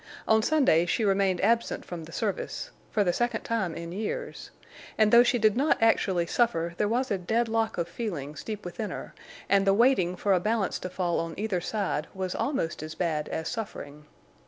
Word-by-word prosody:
On 220 0 +5
Sunday 240 - +3
she 220 - +1
remained 195 -2 +2
absent 230 +3 +1
from 170 -3 -7
the 165 - -12
service—for 360 - -3
the 175 -2 +1
second 240 +1 0
time 205 -8 -1
in 170 0 -6
years—and 220 - -3
though 235 - +9
she 245 +1 +3
did 215 -2 +3
not 285 +5 +3
actually 190 -6 +2
suffer 170 -5 +1
there 210 - +1
was 245 +4 0
a 195 - 0
dead 225 +6 0
lock 225 0 0
of 170 -1 -1
feelings 165 - -5
deep 215 -3 -6
within 205 +4 -4
her, - - -7 0.3
and 195 0 +3
the 195 - +5
waiting 210 -7 +3
for 195 +2 +1
a 185 - +3
balance 210 +1 0
to 185 - -5
fall 180 -2 -1
on 165 0 -4
either 200 -3 -1
side 190 -6 -2
was 185 -1 -3
almost 260 - -2
as 155 0 -7
bad 155 -4 -1
as 160 0 -3
suffering. 150 -10 -6
200 Hz, 190 wpm, -27 LUFS, 175-225 Hz, 0.3 s, though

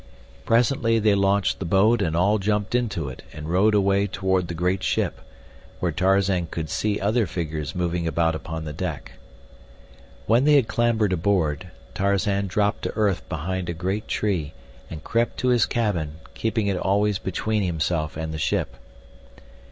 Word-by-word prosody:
Presently 115 0 +2
they 110 -1 +3
launched 100 0 +2
the 95 - -4
boat 100 +7 +3
and 80 -1 0
all 100 +5 +3
jumped 105 +1 -1
into 110 - -1
it 65 - -8
and 75 0 -7
rowed 100 +6 +3
away 100 0 +3
toward 95 -1 0
the 85 - -5
great 90 +3 0
ship, - - -1 0.6
where 90 - 0
Tarzan 95 0 +2
could 80 -2 -5
see 105 -1 0
other 110 +2 +1
figures 80 -4 -4
moving 85 -1 -1
about 80 +1 +1
upon 80 0 -5
the 75 - -5
deck. 60 -3 -5 1.1
When 115 +4 +3
they 150 0 +6
had 135 -6 +4
clambered 110 -4 +1
aboard, 90 -2 0 0.3
Tarzan 100 0 +1
dropped 100 +2 0
to - - -3
earth 105 -4 0
behind 90 +3 -3
a - - -1
great 95 +5 -3
tree 90 -8 -1 0.4
and 80 -1 -8
crept 115 +1 0
to 125 - 0
his 120 -2 +3
cabin, 90 -10 -1 0.2
keeping 110 -1 -1
it 100 -2 0
always 100 +1 +1
between 110 +3 -1
himself 80 -3 -1
and 80 0 -4
the 80 - -4
ship. 65 -4 -1
95 Hz, 165 wpm, -24 LUFS, 85-105 Hz, 1.1 s, they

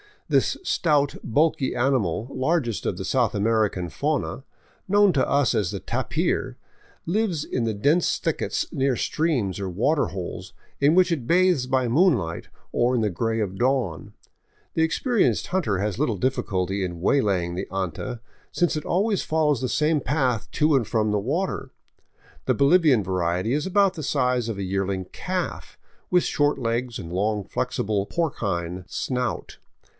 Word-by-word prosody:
This - - +2
stout, 150 - +1
bulky 145 +1 +1
animal, 120 -6 0
largest 130 -4 -1
of - - -1
the - - -4
South - - +1
American 105 -4 +1
fauna, 145 - -2 0.4
known 205 0 +5
to 135 - +2
us 140 -4 +3
as 100 -5 0
the - - -4
tapir, - - -1 0.5
lives 180 -4 0
in 120 - -2
the 110 - 0
dense 145 - +2
thickets - - -1
near 135 -1 +1
streams 125 - -1
or 95 -1 -3
water 140 - +1
holes, 95 -2 -6 0.3
in 145 +4 +4
which 185 -1 +4
it 135 -8 -2
bathes 180 -6 +3
by 130 -1 +1
moonlight 120 - +2 0.2
or 125 +1 +2
in 120 - +1
the 105 - +1
gray 115 +5 -1
of 95 -2 -3
dawn. 125 - 0 0.6
The 160 - +2
experienced 225 +7 +1
hunter 150 - 0
has 100 -1 -2
little 110 -4 +1
difficulty 95 -5 -1
in 85 -2 -5
waylay 100 -5 +2
ing 85 +1 -5
\he 95 - -2
anta, 95 +6 -4 0.3
since 175 -2 +1
it 155 - -5
always 200 +2 +1
follows 150 -4 +1
the 130 - -1
same 155 +3 +2
path 125 -5 0
to 150 -1 +3
and 115 -6 -1
from 110 -2 +1
the 105 - +1
water. 135 - -2 0.7
The - - +2
Bolivian 140 - +4
variety 90 +3 -1
is 150 +4 0
about 195 0 +3
the 160 - -5
size 125 -4 0
of 110 - -3
a 100 - -3
yearling 95 0 -2
calf, - - -4 0.3
with 180 -1 +3
short 145 0 +1
legs 120 0 -2
and 85 -4 -7
a - - -4
long, 105 +1 0
flexible, 100 +2 -2
porcine 95 - -2
snout. 125 +3 -3
125 Hz, 160 wpm, -24 LUFS, 100-155 Hz, 0.7 s, known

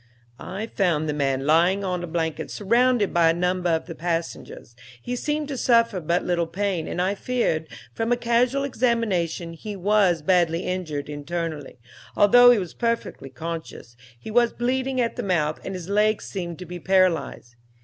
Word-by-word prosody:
"I 195 +4 -5
found 175 -8 0
the 150 - -1
man 135 -2 -1
lying 175 +6 +3
on 180 -2 -2
a - - -4
blanket 160 -1 -3
surrounded 235 +1 +2
by 170 -1 +4
a 165 - +2
number 180 0 0
of 160 -1 0
the 170 - -7
passengers. 165 -8 -5 0.2
He 245 - -4
seemed 295 +3 -2
to 275 - -4
suffer 230 -5 +3
but 170 +2 -1
little 170 -2 0
pain, 185 -1 -2
and - - -4
I 185 +2 +1
feared, 205 -8 -1 0.3
from 225 - -2
a 245 - +3
casual 245 +3 +1
examination, 215 - -1
he 205 +5 -7
was 190 -4 +2
badly 170 -1 +2
injured 160 -7 -4
internally, 150 -1 -5 0.4
although 245 +4 +7
he 245 - +6
was 180 -5 -4
perfectly 230 - -3
conscious; 160 -4 -7 0.2
he 220 - -8
was 235 +1 +3
bleeding 260 +2 -1
at 235 -1 -1
the - - -1
mouth, 165 -7 0
and 190 - -5
his 180 -2 -7
legs 210 +2 +1
seemed 175 -4 -5
to 180 - -8
be 175 +1 -7
paralyzed. 185 -9 +1
180 Hz, 175 wpm, -24 LUFS, 165-230 Hz, 0.4 s, although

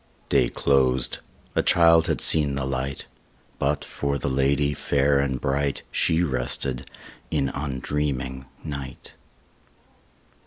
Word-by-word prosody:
Day - - +3
closed; 65 -2 +1 0.3
a - - +2
child 85 -1 +5
had - - -1
seen 75 -3 +5
the 70 -1 -2
light; 65 0 -3 0.5
But, 70 +2 0
for 70 0 -2
the 70 +1 -3
lady 70 +2 +1
fair 70 0 +1
and 65 -2 -1
bright, 70 +1 -1
She 80 +2 +2
rested 65 -2 -2 0.4
in 70 - 0
undreaming 65 -1 -3 0.2
night. 70 -4 -7
70 Hz, 115 wpm, -24 LUFS, 65-70 Hz, 0.5 s, child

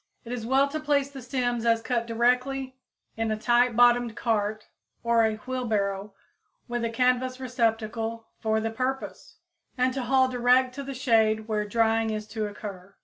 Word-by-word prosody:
It 230 - -8
is 235 -2 -4
well 270 +2 +4
to 310 +2 -3
place 285 -2 0
the 270 -2 -9
stems 245 -2 -1
as 230 -1 +3
cut 235 -2 -1
directly 250 +3 0 0.4
in 225 0 -1
a 215 - -1
tight 240 +1 +2
bottomed 240 -1 +4
cart 215 -2 -1 0.4
or 235 -1 +3
a 220 -1 +1
wheelbarrow, 210 -5 -2 0.5
with 240 -1 -3
a 230 - 0
canvas 255 +2 +1
receptacle 230 -2 -1
for 220 0 +1
the 225 0 -2
purpose, 265 - -4 0.4
and 255 0 +2
to 265 - -2
haul 260 +1 +3
direct 250 +1 +3
to 280 - -6
the 275 -1 -6
shade 220 -3 +2
where 210 -1 -1
drying 225 +1 +2
is 215 -1 -3
to 220 -1 -3
occur. 200 -2 -9
235 Hz, 170 wpm, -26 LUFS, 220-255 Hz, 0.5 s, well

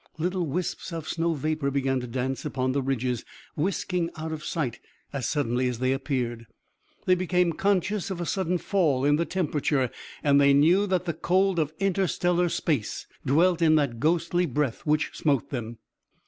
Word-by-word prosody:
Little 180 +1 -1
wisps 175 +4 -3
of 165 -2 -5
snow 165 0 0
vapor 155 0 -1
began 135 -1 0
to 125 - -6
dance 130 +2 -2
upon 130 -3 -1
the 140 +1 0
ridges, 130 -3 -1 0.3
whisking 180 +1 -1
out 160 +1 -4
of 155 -1 -5
sight 140 -7 -2 0.3
as 135 -5 -2
suddenly 125 -4 0
as 125 -2 -2
they 130 +2 +1
appeared. 125 -4 -2 0.6
They 185 - +5
became 180 -1 +2
conscious 200 +2 0
of 190 -3 -4
a 175 - -2
sudden 180 0 0
fall 160 -9 +1
in 145 +1 +4
the 170 - 0
temperature, 150 -7 0 0.3
and 145 -1 +5
they 140 0 +6
knew 175 +8 +4
that 185 -2 0
the 170 - -1
cold 185 +3 +2
of 155 -2 0
interstellar 180 -2 +1
space 145 -9 -1 0.2
dwelt 170 +5 +3
in 160 -1 +5
that 140 -7 +1
ghostly 170 +3 +1
breath 145 +1 -2
which 150 +1 +2
smote 140 -5 0
them. 120 -3 -4
155 Hz, 175 wpm, -26 LUFS, 135-175 Hz, 0.6 s, they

